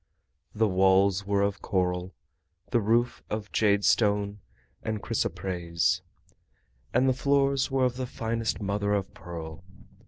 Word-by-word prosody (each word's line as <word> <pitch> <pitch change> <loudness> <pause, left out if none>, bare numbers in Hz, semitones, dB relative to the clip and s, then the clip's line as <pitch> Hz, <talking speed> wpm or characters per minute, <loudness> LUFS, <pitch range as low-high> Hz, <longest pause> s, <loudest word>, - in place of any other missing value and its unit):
The 110 +1 +3
walls 95 +1 +3
were 100 0 +2
of 100 0 -1
coral, 90 -1 -1 0.6
the 120 -2 +3
roof 120 +3 +1
of 105 -1 -4
jadestone 100 0 +2 0.4
and 110 -1 -3
chrysoprase, 85 -4 -1 0.9
and 130 - +3
the 130 - +4
floors 140 0 +2
were 135 -1 +2
of 125 0 -1
the 130 -1 -3
finest 115 -1 -2
mother 100 0 0
of 100 -1 -3
pearl. 85 -1 -8
100 Hz, 125 wpm, -27 LUFS, 95-115 Hz, 0.9 s, the